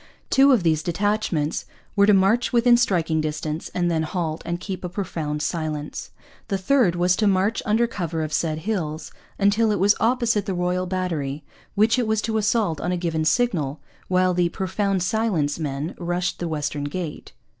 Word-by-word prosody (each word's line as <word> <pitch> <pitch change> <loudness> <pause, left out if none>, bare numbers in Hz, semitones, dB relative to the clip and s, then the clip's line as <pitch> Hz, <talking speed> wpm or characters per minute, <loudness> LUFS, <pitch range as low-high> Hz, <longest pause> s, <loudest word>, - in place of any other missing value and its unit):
Two 275 +1 +6
of 235 -8 +3
these 160 -2 +2
detachments 175 -3 -1 0.3
were 200 -1 +5
to 210 - +6
march 195 +6 +3
within 240 0 +5
striking 170 -9 +1
distance 155 +1 -3
and 175 -1 +1
then 160 -1 +1
'halt 160 0 -3
and 170 0 -3
keep 190 0 -6
a 180 - -3
profound 160 -6 -3
silence.' 155 -3 -3 0.4
The 200 -3 -1
third 190 -2 +2
was 180 +1 +2
to 215 - +2
march 195 +3 +2
'under 220 +3 +3
cover 170 -8 -3
of 155 0 -5
said 155 -1 0
hills' 160 -8 -3 0.3
until 210 +3 +3
it 210 - +1
came 200 +3 +4
opposite 230 -3 +1
the 190 - -1
Royal 180 +1 -1
Battery, 160 -6 -3 0.3
which 220 +4 +3
it 240 - 0
was 220 -1 0
to 220 -1 0
assault 205 -7 +1
on 180 - -1
a 180 - 0
given 165 -2 -1
signal; 160 - +1 0.3
while 185 0 +2
the 175 -1 +2
'profound 190 +1 -1
silence' 185 -8 0
men 145 +1 -3
rushed 175 +1 -2
the 175 - -2
western 150 -2 -3
gate. 155 +1 -6
180 Hz, 180 wpm, -23 LUFS, 160-210 Hz, 0.4 s, Two